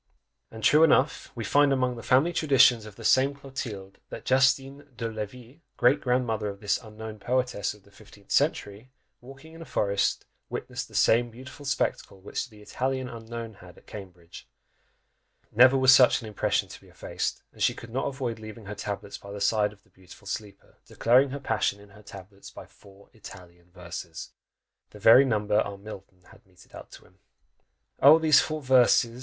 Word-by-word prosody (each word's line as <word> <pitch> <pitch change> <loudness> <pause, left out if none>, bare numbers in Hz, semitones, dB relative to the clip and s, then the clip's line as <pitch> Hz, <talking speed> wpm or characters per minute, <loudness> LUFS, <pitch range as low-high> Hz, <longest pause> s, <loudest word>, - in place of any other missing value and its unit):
And 110 -1 -11
true 155 +7 +5
enough 140 -3 +2
we 115 - -5
find 145 +6 +3
among 130 -2 0
"the 115 - -9
family 135 +9 +2
traditions" 125 -8 +4
of 105 - -13
the 115 - -12
same 135 +4 +3
Clotilde, 115 -8 -8
that - - -9
Justine 135 +2 +1
de 115 - -3
Levis, 115 +4 -8 0.2
great 130 +4 +3
grandmother 120 -4 -1
of 100 -1 -7
this 105 -1 -1
unknown 110 -1 -10
poetess 125 -3 -2
of 105 - -21
the 100 - -23
fifteenth 100 -1 -18
century, 105 +5 -1 0.3
walking 135 +5 -14
in 165 - -12
a - - -8
forest, 100 -6 -1 0.2
witnessed - - -6
the - - -16
same 120 +1 +3
beautiful 130 +4 -11
spectacle 115 -7 -2
which 100 +6 -5
the 105 -2 -16
Italian 130 +3 -3
Unknown 115 -1 -8
had 90 -3 -16
at - - -20
Cambridge; 90 -4 -12 1.0
never 130 +4 +6
was 130 0 +6
such 130 -2 +5
an 110 - -9
impression 105 - -1
to - - -12
be - - -20
effaced, - - -5
and - - -15
she - - +2
could 115 - -11
not 130 +3 -2
avoid 125 -5 -4
leaving 110 0 -11
her 100 - -6
tablets 100 0 -6
by 100 - -13
the 100 - -7
side 105 +1 +1
of 100 -2 -20
the - - -31
beautiful 95 +2 -17
sleeper, 100 +1 -8
declaring 130 +4 +3
her 140 +2 -6
passion 110 -5 -1
in 100 0 -17
her 105 +1 -17
tablets 100 -1 -13
by - - -12
four 100 0 -20
Italian 90 -5 -14
verses! 85 -2 -9 0.6
The - - -14
very 115 +6 +7
number 105 -4 +1
our 100 -2 -3
Milton 95 -3 -12
had - - -19
meted 90 -1 -21 0.2
to - - -15
him! 95 +1 -25 0.8
Oh! 145 +4 +8
these 155 -3 +5
four 155 -1 -3
verses! 125 -2 +3
115 Hz, 185 wpm, -26 LUFS, 100-130 Hz, 1.0 s, Oh